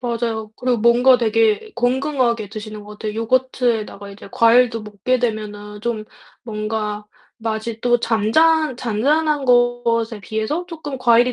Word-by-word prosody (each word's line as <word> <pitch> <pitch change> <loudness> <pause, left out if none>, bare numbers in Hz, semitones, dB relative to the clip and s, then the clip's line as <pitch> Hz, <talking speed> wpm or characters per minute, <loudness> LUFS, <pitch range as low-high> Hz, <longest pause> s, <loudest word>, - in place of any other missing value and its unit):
맞아요. 230 -3 -3
그리고 250 -2 0
뭔가 245 +3 +5
되게 225 - +1
건강하게 245 -3 0
드시는 215 -1 -8
것 210 - -11
같아요. 215 -1 -4
요거트에다가 230 -3 -1
이제 200 0 -12
과일도 230 0 +4
먹게 210 +5 -1
되면은 210 -3 -4
좀 225 -2 -2 0.4
뭔가 215 -1 -4 0.3
맛이 225 0 -4
또 240 -1 +2
잔잔 275 +7 +2
잔잔한 285 +6 +1
것에 245 -3 +2
비해서 220 - -3
쪼끔 315 -5 -6
과일이 245 0 +4
230 Hz, 305 characters per minute, -20 LUFS, 215-250 Hz, 0.4 s, 뭔가